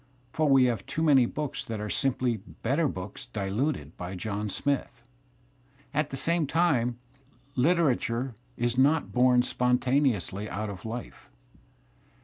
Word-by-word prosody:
For 155 Hz, -2 st, +2 dB
we 135 Hz, -1 st, +6 dB
have 115 Hz, -6 st, 0 dB
too 160 Hz, -, -2 dB
many 135 Hz, -6 st, +5 dB
books 150 Hz, +1 st, -4 dB
that 110 Hz, -2 st, -5 dB
are 105 Hz, -, -3 dB
simply 125 Hz, -1 st, 0 dB
better 135 Hz, -, -1 dB
books 100 Hz, 0 st, -6 dB
diluted 100 Hz, -, -2 dB
by 90 Hz, +2 st, -5 dB
John 105 Hz, +2 st, -3 dB
Smith. 135 Hz, 0 st, -2 dB, 0.4 s
' 130 Hz, +2 st, -33 dB
At 150 Hz, -1 st, 0 dB
the 135 Hz, -, -4 dB
same 165 Hz, +1 st, +1 dB
time, 135 Hz, -8 st, +2 dB, 0.6 s
literature 130 Hz, -5 st, +1 dB, 0.2 s
is 120 Hz, +1 st, 0 dB
not 150 Hz, +4 st, +3 dB
bom 125 Hz, 0 st, +5 dB
spontaneously 125 Hz, -6 st, +1 dB
out 110 Hz, +1 st, -3 dB
^ -, -, -3 dB
of 95 Hz, +1 st, -10 dB
life. 115 Hz, +2 st, -7 dB
125 Hz, 140 wpm, -28 LUFS, 110-140 Hz, 0.6 s, we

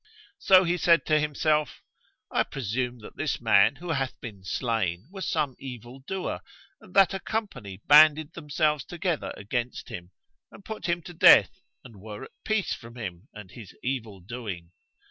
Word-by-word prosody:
So 190 Hz, -1 st, +6 dB
he 175 Hz, 0 st, 0 dB
said 170 Hz, -1 st, +4 dB
to 155 Hz, -1 st, +3 dB
himself, 150 Hz, 0 st, 0 dB, 0.5 s
"I -, -, +2 dB
presume 125 Hz, 0 st, -3 dB
that -, -, -12 dB
this 145 Hz, -1 st, -1 dB
man 110 Hz, +1 st, +4 dB
who 170 Hz, +4 st, -6 dB
hath 135 Hz, -4 st, -2 dB
been 105 Hz, -5 st, -9 dB
slain 100 Hz, -4 st, -2 dB
was 195 Hz, -1 st, -5 dB
some 150 Hz, -5 st, -1 dB
evil 125 Hz, -1 st, -9 dB
doer, 185 Hz, +7 st, -4 dB, 0.4 s
and -, -, -18 dB
that 195 Hz, -1 st, +6 dB
a 195 Hz, -, -3 dB
company 125 Hz, -, -5 dB
banded 155 Hz, +1 st, +6 dB
themselves 150 Hz, -2 st, 0 dB
together 175 Hz, -2 st, -3 dB
against 120 Hz, +4 st, -4 dB
him 90 Hz, 0 st, -8 dB, 0.4 s
and 200 Hz, -, -15 dB
put 215 Hz, -5 st, -6 dB
him 170 Hz, -1 st, -1 dB
to 175 Hz, -, -10 dB
death 165 Hz, -, +7 dB, 0.3 s
and 115 Hz, -6 st, -14 dB
were 105 Hz, +2 st, -8 dB
at -, -, -11 dB
peace 215 Hz, -3 st, 0 dB
from 115 Hz, -1 st, -10 dB
him 95 Hz, -2 st, -7 dB
and 105 Hz, -3 st, -11 dB
his 105 Hz, -2 st, -12 dB
evil 115 Hz, -7 st, -4 dB
doing." 95 Hz, -5 st, -7 dB
130 Hz, 165 wpm, -27 LUFS, 110-160 Hz, 0.5 s, death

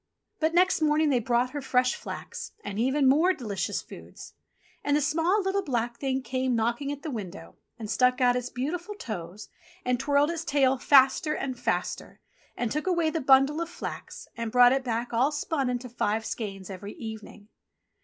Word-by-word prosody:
But 320 Hz, +1 st, +1 dB
next 365 Hz, -1 st, +3 dB
morning 305 Hz, 0 st, +3 dB
they 255 Hz, -, +3 dB
brought 240 Hz, +2 st, +1 dB
her 290 Hz, -, -4 dB
fresh 250 Hz, -1 st, +2 dB
flax -, -, -7 dB
and 205 Hz, +1 st, -5 dB
even 265 Hz, +3 st, +2 dB
more 320 Hz, +8 st, +4 dB
delicious 210 Hz, -, -3 dB
foods. -, -, -12 dB, 0.5 s
And 290 Hz, 0 st, +2 dB
the -, -, +2 dB
small, 330 Hz, +7 st, +1 dB
little, 385 Hz, +1 st, 0 dB
black 240 Hz, -7 st, -2 dB
Thing 265 Hz, -1 st, -1 dB
came 255 Hz, +1 st, -1 dB
knocking 235 Hz, +5 st, -1 dB
at 290 Hz, 0 st, -7 dB
the 310 Hz, -, -4 dB
window 175 Hz, -, -7 dB, 0.2 s
and 225 Hz, -3 st, -6 dB
stuck 250 Hz, +3 st, +2 dB
out 245 Hz, -1 st, +4 dB
its 250 Hz, 0 st, -2 dB
beautiful 340 Hz, +10 st, -4 dB
toes 200 Hz, -, -7 dB, 0.4 s
and 250 Hz, -1 st, +1 dB
twirled 285 Hz, +3 st, +2 dB
its 330 Hz, -1 st, -4 dB
tail 270 Hz, -4 st, +2 dB
faster 275 Hz, +3 st, +4 dB
and 265 Hz, -2 st, -3 dB
faster, -, -, -3 dB, 0.4 s
and 240 Hz, -3 st, -1 dB
took 300 Hz, +4 st, -2 dB
away 340 Hz, -3 st, +2 dB
the 325 Hz, -, -2 dB
bundle 275 Hz, +4 st, +4 dB
of 335 Hz, -, -3 dB
flax 345 Hz, -, -7 dB
and 230 Hz, -1 st, -4 dB
brought 245 Hz, +1 st, +7 dB
it 270 Hz, 0 st, 0 dB
back 235 Hz, -1 st, -3 dB
all 255 Hz, +6 st, +3 dB
spun 295 Hz, -2 st, -1 dB
into 250 Hz, 0 st, -3 dB
five 220 Hz, -2 st, -1 dB
skeins 195 Hz, -5 st, -5 dB
by 195 Hz, +1 st, -8 dB
evening. 215 Hz, -1 st, -9 dB
260 Hz, 185 wpm, -27 LUFS, 235-295 Hz, 0.5 s, brought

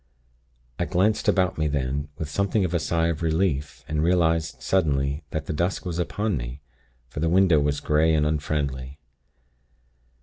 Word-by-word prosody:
"I 85 Hz, -, +1 dB
glanced 95 Hz, +5 st, +1 dB
about 90 Hz, -3 st, +2 dB
me 75 Hz, -, +2 dB
then, 70 Hz, 0 st, -2 dB
with 80 Hz, -, -4 dB
something 100 Hz, +4 st, 0 dB
of 90 Hz, -, -3 dB
a 85 Hz, -, +2 dB
sigh 80 Hz, +1 st, +1 dB
of 80 Hz, -1 st, -3 dB
relief, 80 Hz, -3 st, -1 dB
and 75 Hz, 0 st, -1 dB
realized 80 Hz, -2 st, +1 dB
suddenly 70 Hz, -5 st, +1 dB
that 80 Hz, -, -3 dB
the -, -, -3 dB
dusk 85 Hz, +7 st, -1 dB
was 85 Hz, -1 st, -3 dB
upon 105 Hz, +4 st, -1 dB
me, -, -, -6 dB, 0.5 s
for 65 Hz, -, -7 dB
the 80 Hz, +2 st, +1 dB
window 90 Hz, -3 st, +5 dB
was 70 Hz, 0 st, 0 dB
grey 75 Hz, +2 st, +2 dB
and 75 Hz, -1 st, +2 dB
unfriendly. 70 Hz, -3 st, -2 dB
80 Hz, 165 wpm, -25 LUFS, 75-90 Hz, 0.5 s, window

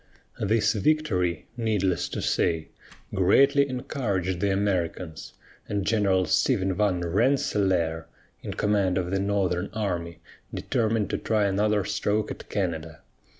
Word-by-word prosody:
This 110 Hz, +1 st, +2 dB
victory, 100 Hz, -, 0 dB
needless 95 Hz, -6 st, 0 dB
to -, -, -4 dB
say, 80 Hz, -2 st, 0 dB, 0.4 s
greatly 140 Hz, +9 st, +4 dB
encouraged 100 Hz, -, -2 dB
the 100 Hz, +1 st, +1 dB
Americans, 90 Hz, -4 st, -2 dB, 0.4 s
and 100 Hz, -2 st, -1 dB
General 100 Hz, -4 st, +2 dB
Stephen 95 Hz, +3 st, +2 dB
van 95 Hz, -2 st, +1 dB
Rensselaer, 90 Hz, -, +1 dB, 0.3 s
in -, -, -6 dB
command 100 Hz, -3 st, +1 dB
of 90 Hz, -1 st, -2 dB
the 95 Hz, -, +1 dB
northern 95 Hz, -2 st, 0 dB
army, 90 Hz, -6 st, -3 dB, 0.3 s
determined 110 Hz, -2 st, -1 dB
to -, -, -1 dB
try 110 Hz, -2 st, +1 dB
another 105 Hz, +1 st, +1 dB
stroke 105 Hz, +1 st, -1 dB
at -, -, -9 dB
Canada. 80 Hz, -4 st, -3 dB
100 Hz, 120 wpm, -26 LUFS, 90-105 Hz, 0.4 s, greatly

